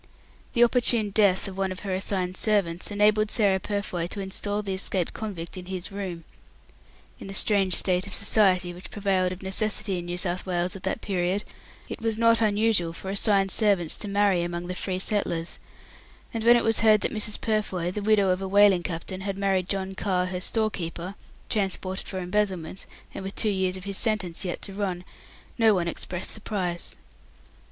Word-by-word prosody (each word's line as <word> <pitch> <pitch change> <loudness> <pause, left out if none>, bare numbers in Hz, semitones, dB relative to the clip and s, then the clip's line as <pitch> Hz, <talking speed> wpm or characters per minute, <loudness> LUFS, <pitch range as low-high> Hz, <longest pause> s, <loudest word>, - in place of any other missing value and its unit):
The 240 - +5
opportune 235 -3 +2
death 200 -2 +3
of 195 0 -7
one 190 -1 0
of 185 - -7
her 195 -2 -3
assigned 185 -1 -1
servants 190 -6 +1
enabled 210 +1 +3
Sarah 200 -4 +2
Purfoy 190 -4 -3
to 200 - -7
instal 205 +2 -3
the 195 -2 -3
escaped 190 -2 -1
convict 190 -5 -6
in 180 -1 -8
his 185 -1 -4
room. 190 -4 -5 1.0
In - - -9
the 195 - -5
strange 195 -3 +5
state 185 +1 +3
of 200 - -7
society 185 -4 +3
which 180 +1 -11
prevailed 190 -3 0
of 185 +1 -8
necessity 195 -1 +1
in 175 - -7
New 175 0 -3
South 180 0 -1
Wales 180 0 0
at 195 - -8
that 190 +3 -2
period, 185 +1 -1 0.4
it - - -7
was 225 -1 -1
not 230 0 +4
unusual 210 -5 +2
for 190 +3 -6
assigned 195 -1 +2
servants 200 -7 +2
to - - -7
marry 200 -3 +2
among 175 0 -3
the 180 - -4
free 185 0 -3
settlers, 185 -4 -1 0.7
and 225 -1 -3
when 240 +1 +7
it 240 - +2
was 225 -1 +3
heard 215 -1 +5
that - - -2
Mrs. 215 -1 -2
Purfoy, 195 -5 -1
the 210 - -4
widow 205 -2 +3
of 185 +1 -1
a 195 - -3
whaling 200 -2 +5
captain, 175 +2 -5
had 195 0 -4
married 195 -2 0
John 195 -1 -2
Carr, 185 -2 0
her 180 0 -4
storekeeper, 185 -4 -2 0.3
transported 190 -2 -1
for 190 - -5
embezzlement, 185 -2 -2 0.3
and - - -6
with 195 +1 -6
two 220 - +2
years 190 -2 0
of 185 - -10
his 200 0 -5
sentence 205 -7 -2
yet 180 -2 -4
to 195 - -3
run, 190 -3 -3 0.6
no 220 -2 +5
one 175 -2 -1
expressed 175 +1 -2
surprise. 185 -5 -2
195 Hz, 190 wpm, -26 LUFS, 180-210 Hz, 1.0 s, when